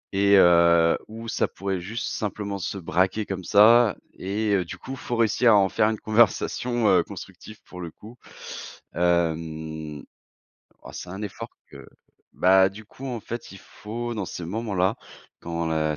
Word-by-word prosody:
et 100 Hz, +1 st, +5 dB
heu, 85 Hz, -2 st, +5 dB
où 115 Hz, +1 st, -9 dB
ça 110 Hz, -, 0 dB
pourrait 95 Hz, -1 st, -4 dB
juste 105 Hz, +7 st, -5 dB
simplement 100 Hz, -1 st, -4 dB
se 95 Hz, -, -4 dB
braquer 95 Hz, +4 st, 0 dB
comme 95 Hz, -2 st, -5 dB
ça 110 Hz, +3 st, +6 dB, 0.2 s
et 105 Hz, +3 st, -2 dB
heu, 95 Hz, -, +2 dB
du -, -, -8 dB
coup, 135 Hz, -, -7 dB
faut 125 Hz, -2 st, -4 dB
réussir 115 Hz, +1 st, +3 dB
à 105 Hz, -, +7 dB
en 95 Hz, -1 st, +3 dB
faire 105 Hz, -, +2 dB
une 110 Hz, -, -3 dB
conversation 120 Hz, +1 st, +2 dB
constructive 110 Hz, 0 st, -10 dB
pour 90 Hz, -, -10 dB
le 85 Hz, -, -5 dB
coup. 110 Hz, +8 st, -14 dB, 0.8 s
Hem, 80 Hz, -3 st, -1 dB, 0.8 s
oh, -, -, -10 dB
c'est -, -, -8 dB
un 95 Hz, +3 st, -6 dB
effort 105 Hz, -, -6 dB, 0.2 s
que -, -, -12 dB, 0.5 s
bah, 95 Hz, +1 st, +5 dB
du 105 Hz, +3 st, -12 dB
coup 130 Hz, +5 st, -10 dB
en 120 Hz, -3 st, -4 dB
fait, 120 Hz, +2 st, -7 dB
il 95 Hz, -, -11 dB
faut, 120 Hz, +5 st, -6 dB
dans 105 Hz, -3 st, -3 dB
ces 85 Hz, -, -6 dB
moments-là, 100 Hz, -1 st, -1 dB, 0.4 s
quand 85 Hz, 0 st, -3 dB
la 80 Hz, -1 st, 0 dB
100 Hz, 165 wpm, -25 LUFS, 85-110 Hz, 0.8 s, à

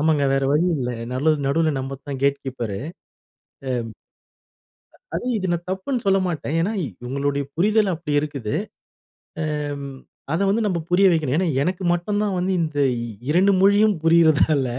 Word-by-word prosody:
ஆமாங்க 155 Hz, -2 st, +2 dB
வேற 135 Hz, -, +1 dB
வழி 155 Hz, +4 st, +3 dB
இல்ல. 125 Hz, -2 st, -2 dB, 0.2 s
நலு 140 Hz, +5 st, +2 dB
நடு 145 Hz, -2 st, -2 dB
நடுவுல 155 Hz, +3 st, +2 dB
நம்ம 135 Hz, +1 st, -4 dB
தான் 135 Hz, -2 st, -4 dB
கேட் 140 Hz, 0 st, +2 dB
கீப்பரு. 120 Hz, -7 st, -4 dB
எம் -, -, -8 dB, 2.2 s
அது -, -, -4 dB
இது 190 Hz, -2 st, -2 dB
நான் 170 Hz, 0 st, -3 dB
தப்புன்னு 225 Hz, +6 st, -2 dB
சொல்லமாட்டேன். 180 Hz, -6 st, 0 dB
ஏன்னா, 205 Hz, +5 st, 0 dB, 0.3 s
இவங்களோட 140 Hz, +2 st, -1 dB
புரிதல் 210 Hz, +2 st, +3 dB
அப்டி 160 Hz, -2 st, -5 dB
இருக்குது. 140 Hz, -8 st, -4 dB, 1.1 s
ஏம் 145 Hz, -1 st, -5 dB, 0.4 s
அத 165 Hz, -, 0 dB
வந்து 225 Hz, +3 st, +1 dB
நாம 185 Hz, -5 st, 0 dB
புரிய 190 Hz, +3 st, +5 dB
வைக்கணும். 150 Hz, -4 st, +1 dB
ஏன்னா, 185 Hz, -1 st, +1 dB, 0.2 s
எனக்கு 185 Hz, +3 st, -2 dB
மட்டும் 205 Hz, +4 st, -1 dB
தான் 200 Hz, -3 st, -1 dB
வந்து 185 Hz, +2 st, 0 dB
இந்த 155 Hz, -2 st, -3 dB, 0.2 s
இ -, -, -4 dB, 0.2 s
இரண்டு 185 Hz, +6 st, +4 dB
மொழியும் 205 Hz, +1 st, +5 dB
புரியிறதால 160 Hz, -4 st, +4 dB
160 Hz, 155 wpm, -22 LUFS, 140-190 Hz, 2.2 s, புரிய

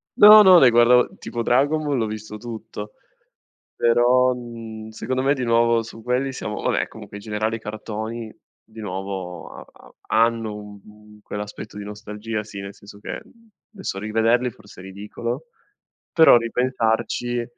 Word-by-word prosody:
No, 210 Hz, +1 st, +10 dB
no, 185 Hz, -3 st, +8 dB
ne 130 Hz, -, +7 dB
guardavo, 120 Hz, +1 st, +5 dB
tipo 120 Hz, -1 st, -4 dB
Dragon 145 Hz, +6 st, +2 dB
Ball 145 Hz, -3 st, 0 dB
l'ho 110 Hz, -2 st, 0 dB
visto 105 Hz, 0 st, -7 dB
tutto, 110 Hz, -2 st, -8 dB, 0.8 s
però, 125 Hz, +2 st, +4 dB
mhmm, 115 Hz, -2 st, -8 dB
secondo 130 Hz, +4 st, -3 dB
me 140 Hz, +2 st, +2 dB
di 130 Hz, -, -3 dB
nuovo 115 Hz, 0 st, +3 dB
su 115 Hz, 0 st, -11 dB
quelli 125 Hz, +3 st, -1 dB
siamo 105 Hz, -4 st, -5 dB
vabbè -, -, 0 dB
comunque 100 Hz, -, -11 dB
in 100 Hz, -, -11 dB
generale 110 Hz, +1 st, -2 dB
i -, -, -14 dB
cartoni 110 Hz, +1 st, -6 dB, 0.3 s
di 110 Hz, 0 st, -13 dB
nuovo 95 Hz, -2 st, -6 dB
ha -, -, -10 dB
ha -, -, -19 dB, 0.2 s
hanno, 115 Hz, -1 st, +2 dB, 0.3 s
uhm, 105 Hz, 0 st, -17 dB
quell'aspetto 105 Hz, 0 st, -7 dB
di 105 Hz, -, -6 dB
nostalgia 105 Hz, +1 st, -6 dB
sì, 105 Hz, -1 st, -9 dB
nel 100 Hz, 0 st, -7 dB
senso 100 Hz, 0 st, -14 dB
che -, -, -6 dB, 0.5 s
adesso 190 Hz, -, -5 dB
rivederli 115 Hz, +4 st, +1 dB
forse 105 Hz, -4 st, -15 dB
è -, -, -12 dB
ridicolo, 105 Hz, -, -6 dB, 0.7 s
però 160 Hz, -7 st, +7 dB
ripensarci, 120 Hz, 0 st, 0 dB
115 Hz, 155 wpm, -22 LUFS, 105-120 Hz, 0.8 s, No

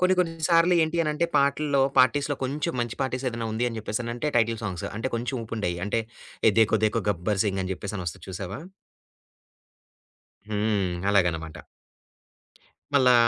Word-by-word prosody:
కొన్ని 185 Hz, +1 st, +4 dB
కొన్నిసార్లు 165 Hz, +1 st, +3 dB
ఏంటి 160 Hz, +2 st, -1 dB
అనంటే 150 Hz, +2 st, 0 dB
పాటల్లో 140 Hz, 0 st, +2 dB, 0.2 s
పార్టీస్‌లో 145 Hz, +2 st, +4 dB
కొంచెం 150 Hz, +6 st, -2 dB
మంచి 120 Hz, -1 st, -3 dB
పార్టీస్ 130 Hz, 0 st, -2 dB
ఏదైనా 115 Hz, -1 st, -4 dB
ఉంది 115 Hz, +3 st, 0 dB
అని 115 Hz, -, -6 dB
చెప్పేసనంటే 120 Hz, +5 st, -3 dB
టైటిల్ 115 Hz, -1 st, +2 dB
సాంగ్స్. 100 Hz, -1 st, -3 dB
అంటే 120 Hz, +4 st, -2 dB
కొంచెం 120 Hz, +3 st, -2 dB
ఊపు 115 Hz, -, -6 dB
ఉండేయి. 90 Hz, -5 st, -1 dB
అంటే, 115 Hz, -, +1 dB, 0.5 s
'ఏ -, -, +8 dB
దేఖో 110 Hz, -, +4 dB
దేఖో 110 Hz, 0 st, +1 dB
గబ్బర్‌సింగ్,' 95 Hz, +1 st, 0 dB
అని 95 Hz, -, -4 dB
జెప్పేసని 95 Hz, 0 st, -5 dB
ఒస్తది 80 Hz, -, -5 dB
చూశావా? 95 Hz, -, -5 dB, 1.9 s
హ్మ్. 105 Hz, -3 st, 0 dB, 0.2 s
అలాగనమాట. 85 Hz, -4 st, +1 dB, 1.4 s
మళ్ళా, 130 Hz, -3 st, +6 dB
115 Hz, 140 wpm, -26 LUFS, 100-140 Hz, 1.9 s, ఏ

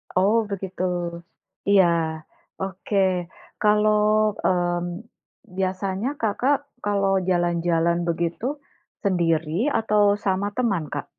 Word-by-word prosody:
Oh, 195 Hz, +4 st, +3 dB
begitu. 190 Hz, -2 st, -4 dB, 0.9 s
Iya, 195 Hz, -2 st, +6 dB, 0.8 s
oke. 195 Hz, +2 st, -4 dB, 0.7 s
Kalau 210 Hz, 0 st, +4 dB, 0.4 s
mmm, 175 Hz, +2 st, 0 dB, 0.5 s
biasanya 190 Hz, +3 st, -1 dB
Kakak 245 Hz, +6 st, +2 dB, 0.3 s
kalau 200 Hz, -1 st, +1 dB, 0.2 s
jalan-jalan 170 Hz, -1 st, +1 dB
begitu 170 Hz, +6 st, -2 dB, 0.6 s
sendiri, 165 Hz, -5 st, +1 dB, 0.3 s
atau 215 Hz, -2 st, +2 dB, 0.2 s
sama 195 Hz, +1 st, 0 dB
teman, 205 Hz, -10 st, +1 dB
Kak? -, -, -3 dB
190 Hz, 85 wpm, -24 LUFS, 175-205 Hz, 0.9 s, Iya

